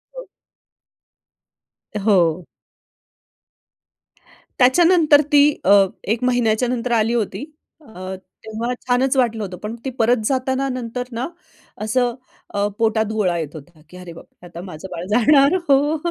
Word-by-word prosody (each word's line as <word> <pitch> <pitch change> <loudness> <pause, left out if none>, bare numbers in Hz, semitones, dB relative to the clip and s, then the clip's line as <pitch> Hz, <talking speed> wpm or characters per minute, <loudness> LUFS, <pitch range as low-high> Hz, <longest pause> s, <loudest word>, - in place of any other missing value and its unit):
हं. - - -8 1.7
हो. 180 -5 +1 2.1
त्याच्यानंतर 310 +3 +5
ती 290 - +6 0.2
अ, 200 +1 +6 0.2
1 225 +4 -2
महिन्याच्यानंतर 245 0 0
आली 225 0 +2
होती. 235 +3 -2 0.4
अ, 190 -7 -8 0.3
तेव्हा 225 +3 -4
छानच 255 +2 +1
वाटलं 230 -4 +1
होतं. 185 -2 -7
पण 215 +2 -5
ती - - -1
परत 240 +2 +3
जाताना 265 +2 -1
नंतर 250 -1 -4
ना 235 +3 -3 0.6
असं 240 +2 0 0.4
अ, 205 0 0
पोटात 220 -1 +1
गोळा 185 -6 0
येत 155 -1 -5
होता 155 +1 -13
की 180 - -13
अरे 180 -2 -10
बापरे! 170 - -16
आता 170 0 -10
माझं 180 +3 -9
बाळ 175 0 -6
जाणार 275 - +4
हो. 290 +3 +3
230 Hz, 125 wpm, -20 LUFS, 195-255 Hz, 2.1 s, ती